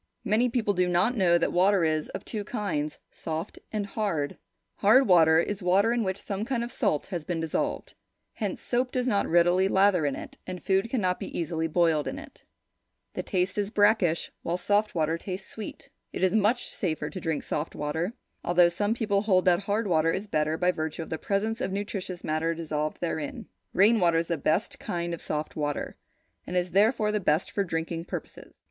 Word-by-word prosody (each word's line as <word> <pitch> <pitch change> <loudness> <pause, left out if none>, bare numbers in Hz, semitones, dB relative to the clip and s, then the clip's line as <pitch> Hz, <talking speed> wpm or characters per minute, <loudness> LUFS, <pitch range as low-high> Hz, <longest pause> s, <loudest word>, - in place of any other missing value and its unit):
Many 225 +5 +2
people 225 -4 +1
do 180 -1 +2
not 180 +8 +2
know 180 -5 +4
that 170 - 0
water 185 +1 +4
is 155 -1 0
of - - -7
two 215 -3 -4
kinds, 190 -9 -3
soft 160 +4 -5
and 210 -2 -2
hard. 195 -9 -2 0.4
Hard 240 +7 +5
water 160 -4 +6
is 200 +4 -2
water 195 +6 +3
in 240 -1 +1
which 190 -1 -2
some 200 +1 -4
kind 235 0 -1
of 240 - -5
salt 150 - 0
has 175 -5 -4
been 170 +1 -3
dissolved. 160 -1 -2 0.4
Hence, - - -4
soap 250 +1 0
does 250 -1 -1
not 205 -6 +1
readily 175 +3 +4
lather 190 -5 +3
in 140 - -1
it, - - -9
and 180 -3 -6
food 195 +3 +1
cannot 185 -8 0
be - - -5
easily 165 -1 -1
boiled 160 -2 +2
in 275 - -4
it. 305 -1 -12 0.7
Its - - -5
taste 185 +1 0
is 205 -1 -1
brackish, 205 -6 +2
while 170 +1 -1
soft 205 +3 +1
water 160 0 0
tastes 190 +1 -6
sweet. 215 -2 -8 0.2
It - - -4
is 185 - +3
much 220 +3 +2
safer 155 -5 -2
to 185 - -6
drink 160 -3 -2
soft 150 +2 -3
water, 160 +7 -2 0.3
although 175 0 +5
some 205 +6 0
people 205 -4 +1
hold 190 -4 +2
that 175 -2 +4
hard 205 +3 -1
water 165 -4 +2
is 195 +5 -3
better 155 -5 0
by 180 +1 +3
virtue 160 -1 -4
of - - -12
the 160 - -2
presence 220 +4 -1
of 195 - -1
nutritious 195 -2 -4
matter 160 +2 0
dissolved 155 -2 -3
therein. 160 -3 -3 0.3
Rain 215 +4 +5
water 170 -3 +3
is 165 0 -1
the 170 - 0
best 165 +9 0
kind 170 -1 -3
of 170 - -6
soft 150 0 -4
water, 145 -1 -3 0.5
and 180 - -2
is 180 0 0
therefore, 210 +3 +3
the 210 - 0
best 160 -3 +1
for 200 - 0
drinking 165 -1 -3
purposes. - - -8
180 Hz, 200 wpm, -27 LUFS, 165-205 Hz, 0.7 s, water